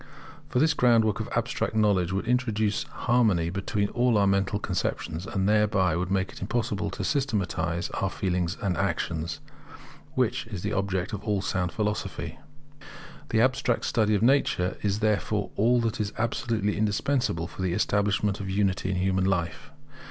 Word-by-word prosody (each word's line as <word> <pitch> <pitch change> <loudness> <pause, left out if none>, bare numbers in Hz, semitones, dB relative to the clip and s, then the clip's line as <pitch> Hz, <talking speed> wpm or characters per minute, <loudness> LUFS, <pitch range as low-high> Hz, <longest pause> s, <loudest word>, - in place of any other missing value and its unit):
For - - -1
this 155 +4 +4
groundwork 115 -5 +3
of 110 - -4
abstract - - -1
knowledge 100 -5 +2
would 95 +3 -1
introduce 110 -4 +1
harmony 105 -9 +1
between 100 +2 -1
all 120 -2 +2
our 100 - +4
mental 100 +1 +1
conceptions, 85 -3 -3
and 95 -1 0
thereby 105 -5 +3
would 90 +1 -2
make 95 -1 0
it - - -12
impossible 110 0 -1
to 100 - -5
systematize 90 - -1
our 95 - -1
feelings 90 -1 -1
and 95 -3 +1
actions, 80 -1 -2 0.7
which 125 -1 0
is 100 -6 -6
the 105 - -1
object 95 -1 -1
of 105 - -4
all 105 -3 0
sound 90 -2 -1
philosophy. 105 -1 -3 0.9
The 110 - +3
abstract 130 -1 +1
study 110 -2 +2
of 105 - +1
nature 115 -8 +2
is 105 +1 0
therefore 105 -1 0
all 120 +4 +3
that 115 -1 -1
is 105 -1 -2
absolutely 115 -3 -1
indispensable 105 -3 0
for 90 - -8
the 90 -2 0
establishment 100 0 +1
of 95 -1 -5
unity 95 -1 0
in 95 - 0
human 95 0 +1
life. 90 -3 -1
100 Hz, 160 wpm, -27 LUFS, 95-110 Hz, 0.9 s, this